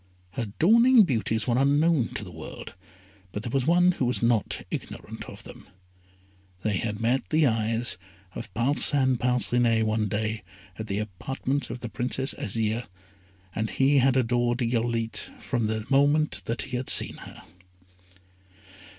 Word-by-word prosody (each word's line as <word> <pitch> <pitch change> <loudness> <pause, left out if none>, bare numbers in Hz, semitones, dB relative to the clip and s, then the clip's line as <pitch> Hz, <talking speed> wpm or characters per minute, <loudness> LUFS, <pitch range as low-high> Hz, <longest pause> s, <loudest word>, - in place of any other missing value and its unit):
Her 120 -5 -3
dawning 230 +6 +6
beauties 110 - 0
were 120 0 +2
unknown 145 -1 +3
to - - -2
the 90 - -9
world, 80 -2 -9 0.6
but 105 - -5
there 120 - -4
was 135 0 0
one 175 +2 +5
who 140 - -1
was 125 -1 -1
not 115 -3 +1
ignorant - - -6
of - - -10
them. - - -13 1.0
They 105 -2 +1
had 105 +1 -3
met 120 +3 0
the 155 0 +3
eyes 115 -3 0 0.3
of 115 - -7
Parcin 130 +1 +2
Parcinet 120 -2 +2
one 110 0 0
day 110 +2 -2 0.4
at 110 - -5
the 100 - -2
apartments 130 +7 -3
of 125 - -6
the 120 - -5
Princess 130 +3 -1
Azire, 110 +2 -2 0.7
and 110 +1 -2
he 135 +1 +3
had 130 0 +3
adored 120 0 +1
Irolite 115 -1 -1
from 120 -4 -1
the 110 0 -2
moment 145 +3 +3
that 115 - -2
he 125 -2 -4
had 130 - -4
seen - - +2
her. - - -11
120 Hz, 150 wpm, -26 LUFS, 110-135 Hz, 1.0 s, dawning